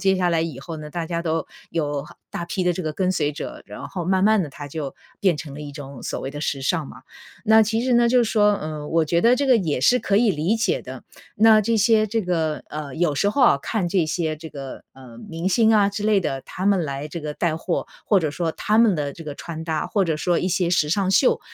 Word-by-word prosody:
接 195 -1 +4
下 180 -1 +1
来 165 -2 +2
以 160 -5 -5
后 160 +4 -7
呢， 150 -1 -8
大 170 +1 -4
家 170 0 -3
都 160 -1 -1 0.2
有 145 -4 -2 0.3
大 170 - -4
批 185 +2 -2
的 180 - +3
这 185 - -4
个 155 -2 -3
跟 185 +3 0
随 150 -4 0
者， 150 - -7
然 - - -9
后 180 -3 -5
慢 185 +2 +1
慢 215 -2 +4
地 150 - -6
它 145 +1 -9
就 140 -2 -5 0.3
变 185 -5 +3
成 145 -2 -7
了 145 - -8
一 145 - -8
种 140 -3 -9
所 - - -4
谓 135 - -4
的 145 - -7
时 140 -2 -2
尚 150 +3 0
嘛。 - - -12 0.4
那 220 0 +6
其 225 +2 0
实 255 0 +2
呢 240 0 +5
就 250 +1 +4
是 225 - -1
说， 210 -2 +4
呃， 155 -3 -6
我 165 0 +2
觉 170 +3 +1
得 235 +2 +6
这 280 +2 0
个 255 -3 +6
也 155 - -1
是 245 - +4
可 200 -4 +1
以 230 -3 +4
理 175 +8 0
解 420 - 0
的， - - -9 0.3
那 215 -1 +6
这 230 +3 +1
些 215 0 +4
这 225 +2 -1
个 165 -5 -1
呃， 150 -3 -6
有 165 -3 +1
时 200 +8 +1
候 280 - -1
啊， 235 - +6
看 205 -6 -1
这 175 -1 +2
些 155 0 -2
这 160 +1 -10
个， 135 -3 -8
呃， 130 -3 -14
明 165 +3 -3
星 225 +3 +4
啊 205 -2 +4
之 200 +1 -5
类 210 -1 +3
的， 135 -6 -3
他 185 - -5
们 195 -4 +3
来 140 0 -4
这 170 - -6
个 150 -1 -4
带 160 +1 -1
货， 170 +1 -2 0.2
或 200 -3 +3
者 155 -3 -1
说 165 +1 -2
他 210 - 0
们 225 -3 +5
的 145 -3 -2
这 165 - -10
个 145 - -6
穿 160 +1 -7
搭， 160 -2 -2
或 200 -3 +1
者 160 -3 -1
说 175 +2 +1
一 185 - -1
些 180 -1 +1
时 155 -4 +2
尚 190 +2 +1
秀， 250 +6 +3
170 Hz, 285 characters per minute, -23 LUFS, 150-205 Hz, 0.4 s, 那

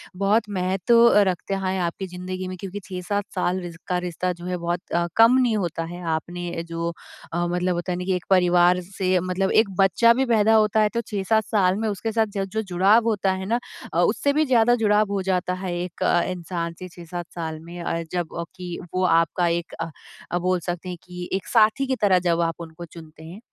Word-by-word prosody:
बहुत 200 +4 +2
महत्व 195 +6 +4 0.2
रखता 185 +2 -2
है 190 0 -1
आपकी 175 +3 -3
ज़िंदगी 185 +1 -6
में 185 - -5
क्योंकि 195 +1 -6
6-7 195 +2 -3
साल 185 0 0
रि 175 -1 -6 0.2
का 180 - 0
रिश्ता 180 +1 -2
जो 175 0 -11
है 180 0 -2
बहुत 170 0 -2 0.2
अ, 170 0 +1
कम 230 +3 +7
नहीं 245 -4 +2
होता 170 -4 -2
है। 175 +2 -8
आपने 175 +1 -5
जो 165 0 -2 0.4
अ, 175 0 0
मतलब 180 +1 0
होता 175 +1 -3
है 175 - -1
ना 180 - -4
कि 190 -1 +1
एक 180 - -5
परिवार 180 -1 +4
से 185 0 0
मतलब 185 +2 -1
एक 215 - -5
बच्चा 195 +5 +5
भी 265 +3 +1
पैदा 225 -2 +3
होता 215 0 +3
है 210 - +3
तो 235 - 0
6-7 215 +2 +1
साल 190 -4 +2
में 225 - -1
उसके 210 +2 -3
साथ 220 -1 +2
ज 195 - 0
जो 220 - 0
जुड़ाव 195 +4 +3
होता 200 -3 +1
है 190 0 -3
ना 235 +4 0 0.3
अ, - - +2
उससे 285 0 +2
भी 310 +1 +2
ज़्यादा 240 -3 +4
जुड़ाव 210 0 +3
हो 195 -1 0
जाता 180 0 0
है 175 - -2
एक 180 -1 -6
अ, 175 - +3
इंसान 170 -2 -4
से 185 - -7
6-7 175 0 -7
साल 160 -2 -4
में। 170 +2 -10
अ, 165 0 -2
जबकि 175 +1 -5 0.2
वो 185 - +1 0.2
आपका 170 +1 0
एक 170 0 -2
अ 165 - -3 0.4
अ, 175 - +1
बोल 180 0 +1
सकते 175 +2 -5
हैं 180 - -5
कि 180 0 -8
एक 195 - -4
साथी 230 +4 +3
की 260 - 0
तरह 195 -3 +4
जब 170 0 +2
आप 165 -1 0
उनको 165 +1 -9
चुनते 160 -1 -13
हैं 170 +5 -10
180 Hz, 220 wpm, -23 LUFS, 175-205 Hz, 0.4 s, कम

